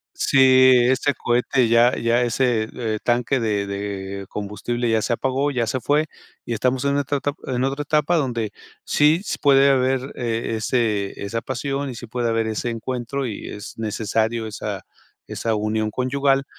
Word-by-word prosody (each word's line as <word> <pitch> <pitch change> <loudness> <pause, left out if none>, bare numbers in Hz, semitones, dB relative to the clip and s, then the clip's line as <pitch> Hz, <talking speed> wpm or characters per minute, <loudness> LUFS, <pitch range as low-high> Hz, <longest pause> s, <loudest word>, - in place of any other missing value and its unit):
sí, 130 -1 +5 0.2
ese 135 +2 +1
cohete, 120 +1 +1
ya 115 +2 +4
ya 115 +1 +2
ese, 120 -2 +1
e 110 -3 -2
tanque 125 +2 +1
de 105 -3 0
de 100 -1 -5
combustible 115 +4 -3
ya 110 -1 +2
se 120 - 0
apagó, 135 +4 0
ya 125 -4 -1
se 130 +4 -2
fue, 150 +4 +1 0.4
y - - -4
estamos 125 +3 0
en 140 0 +1
otra 145 0 -1
etap 145 +2 -3
en 125 -1 0
otra 135 +2 -1
etapa 150 +3 +1
donde, 120 -8 -1 0.3
sí 155 +4 +3 0.2
puede 140 -1 +5
haber 130 0 +1
eh, 115 -1 -2
ese 110 -3 -1
esa 115 +3 -3
pasión, 135 +3 -3
y 130 - -6
sí 120 +1 -8
puede 120 +1 -2
haber 115 0 0
ese 110 +2 -2
encuentro 125 +3 -3
y 110 -4 -6
es 105 +1 -9
necesario 110 +1 -1
esa 105 -2 -5 0.4
esa 115 -1 -2
unión 110 0 -1
conyugal, 135 +3 +1
120 Hz, 165 wpm, -22 LUFS, 110-135 Hz, 0.4 s, sí